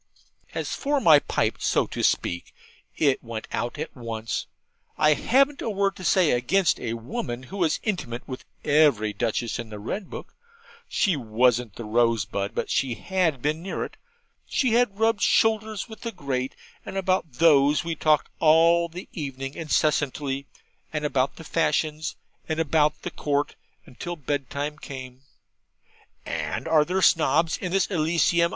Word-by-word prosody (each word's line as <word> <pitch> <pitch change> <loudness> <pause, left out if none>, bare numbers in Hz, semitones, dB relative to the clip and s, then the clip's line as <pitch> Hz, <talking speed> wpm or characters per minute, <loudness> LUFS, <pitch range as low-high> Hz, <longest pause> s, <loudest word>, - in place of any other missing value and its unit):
As - - -2
for 290 0 0
my 160 - +7
pipe, - - -1
so - - +2
to - - -5
speak, 85 0 0 0.4
it 140 -3 +2
went 115 -2 -6
out 120 +5 -2
at 155 - -5
once. 115 -3 -4 0.5
I 150 0 +5
hadn't 275 - +2
a - - -2
word 200 -1 0
to 185 - -9
say 180 -2 +4
against 165 +10 +2
a 115 -2 -3
woman 120 +1 -5
who 190 +10 -8
was 170 -5 +1
intimate 150 - -3
with 130 - -7 0.2
every 140 -9 +3
Duchess 120 0 -2
in 115 -2 -6
the 105 - -7
Red 175 - -5
Book. - - -8 0.6
She 195 -6 +2
wasn't 120 -2 +1
the 120 - -6
rosebud, 110 -3 0
but - - -2
she 130 -3 0
had 170 -8 0
been 155 +2 0
near 190 - -3
it. - - -11 0.5
She 255 -4 +1
had 235 -4 +2
rubbed 225 -2 +2
shoulders 220 -1 +2
with 220 -1 -11
the 230 - -4
great, 135 - -3 0.3
and 195 - -6
about 185 -6 0
these 145 +1 +4
we 170 -1 -2
talked 155 -1 +2
all 165 +2 +5
the 175 +3 -8
evening 135 -3 -5
incessantly, 145 -3 0 0.4
and 150 -1 -2
about 135 -2 0
the 165 - -10
fashions, 155 -1 0 0.3
and 160 0 -1
about 150 -1 +2
the - - -4
Court, 145 0 -1 0.3
until 175 +7 -6
bed 145 -3 -3
time 150 +2 -4
came. 130 -3 -9 1.0
'And - - -3
are 160 -2 +5
there 185 +2 0
Snobs 160 0 +4
in 180 - -4
this 195 0 +3
Elysium?' 170 0 +2
150 Hz, 160 wpm, -25 LUFS, 130-175 Hz, 1.0 s, my